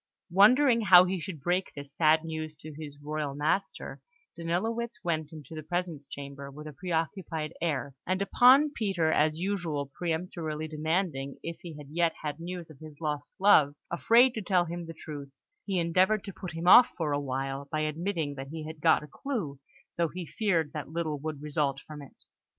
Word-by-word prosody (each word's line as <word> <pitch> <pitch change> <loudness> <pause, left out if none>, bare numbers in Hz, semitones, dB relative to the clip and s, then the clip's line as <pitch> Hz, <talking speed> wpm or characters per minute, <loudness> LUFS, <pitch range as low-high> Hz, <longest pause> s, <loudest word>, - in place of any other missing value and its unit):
Wondering 230 +6 +6
how 180 -2 +9
he 185 0 -1
should 165 -1 -6
break 180 +5 0
this 140 -1 -9
sad 155 0 +4
news 155 -1 -5
to 155 0 -10
his 145 -1 -9
royal 150 -1 -3
master, 155 +7 -2 0.3
Danilowitz 220 +6 -2
went 160 -3 -1
into 155 0 -10
the 155 - -5
presence 170 -3 -3
chamber 140 0 -8
with 150 +2 -10
a 155 - -7
preoccupied 165 0 -3
air, 145 -4 -1
and 185 +1 +1
upon 255 +8 +6
Peter 190 - 0
as 155 0 +2
usual 165 -7 -2
peremptorily 160 -2 -3
demanding 155 -3 -2
if 165 0 -5
he 165 -4 -8
yet 170 0 +2
had 150 0 -3
news 170 -1 -6
of 140 - -16
his 155 -2 -12
lost 150 -2 -3
love, 170 -8 +5 0.2
afraid 235 +8 +5
to 220 - -3
tell 180 -2 +2
him 170 0 -6
the 165 - -8
truth, 140 -3 -9 0.3
he 195 -2 -1
endeavoured 185 +5 +2
to 195 - -7
put 180 -2 -7
him 165 +2 -4
off 245 +6 +9
for 155 -3 -1
a 145 - +1
while 135 0 -3
by 155 - 0
admitting 160 0 -2
that 135 -1 -7
he 155 +1 -6
had 155 -1 -8
got 160 -1 +4
a - - -9
clue, 160 - -4 0.4
though 170 -1 +2
he 180 -1 -5
feared 165 -5 0
that 150 -3 -5
little 160 -2 -2
would 150 -1 -5
result 145 -2 0
from 150 +1 -10
it. 140 - -15
160 Hz, 185 wpm, -29 LUFS, 150-180 Hz, 0.4 s, how